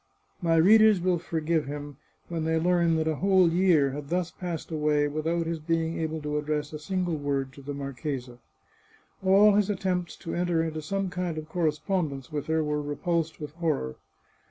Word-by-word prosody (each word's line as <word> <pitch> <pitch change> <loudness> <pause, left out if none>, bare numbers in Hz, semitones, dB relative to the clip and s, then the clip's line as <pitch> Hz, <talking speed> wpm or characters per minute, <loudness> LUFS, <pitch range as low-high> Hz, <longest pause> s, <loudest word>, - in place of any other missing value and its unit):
My 165 -2 +2
readers 215 +4 +6
will 180 -1 +1
forgive 160 -2 -1
him 145 -1 -6 0.3
when 165 -2 -3
they 160 0 +1
learn 170 0 +2
that 160 0 0
a 155 -2 0
whole 190 -2 +4
year 170 -6 +3
had 140 +1 -7
thus 175 0 -1
passed 175 -3 -6
away 150 -1 +2
without 160 +3 -1
his 165 0 -2
being 165 +1 -1
able 160 0 -2
to 150 0 -1
address 150 0 -2
a 155 - -5
single 175 0 -1
word 140 -2 -2
to 140 - -12
the 145 +1 -6
mar 140 -1 -5
chesa. 125 -3 -5 0.8
All 200 +2 +6
his 205 0 +2
attempts 185 -3 -1
to 165 - -7
enter 175 -2 +1
into 155 -1 -3
some 195 +4 -2
kind 180 -3 -3
of 155 0 -5
corre 165 0 +1
spondence 155 -3 -3
with 145 -2 -3
her 160 0 +1
were 150 0 -1
repulsed 160 +2 -2
with 150 -2 -6
horror. 155 - -2
160 Hz, 190 wpm, -27 LUFS, 150-175 Hz, 0.8 s, readers